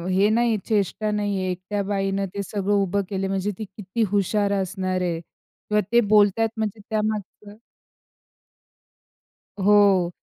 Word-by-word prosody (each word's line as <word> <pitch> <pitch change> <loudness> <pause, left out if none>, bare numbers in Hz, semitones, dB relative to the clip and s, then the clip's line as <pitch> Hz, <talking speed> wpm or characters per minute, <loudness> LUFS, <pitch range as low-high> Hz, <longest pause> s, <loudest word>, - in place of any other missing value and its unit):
हे 200 +2 +4
नाही 235 +2 +2
आहे, 220 - +1
चेष्टा 210 0 0
नाही 205 -1 -1
आहे 185 0 -1
एकट्या 190 +3 -3
बाईनं 195 0 -1
ते 200 - -2
सगळं 205 0 -2
उभं 200 +2 0
केले 195 -1 -2
आहे, - - -1
म्हणजे 195 +1 -1
ती 215 - -4
किती 210 +2 -2
हुशार 205 0 +1
असणार 185 -1 -2
आहे 170 -2 -1
किंवा 210 +5 -4
ते 235 - +6
बोलतायत, 210 +1 +3
म्हणजे 220 -1 -2
त्यामागचं" 210 -1 -3 2.0
हो, 195 -3 +4
205 Hz, 145 wpm, -23 LUFS, 190-210 Hz, 2.0 s, ते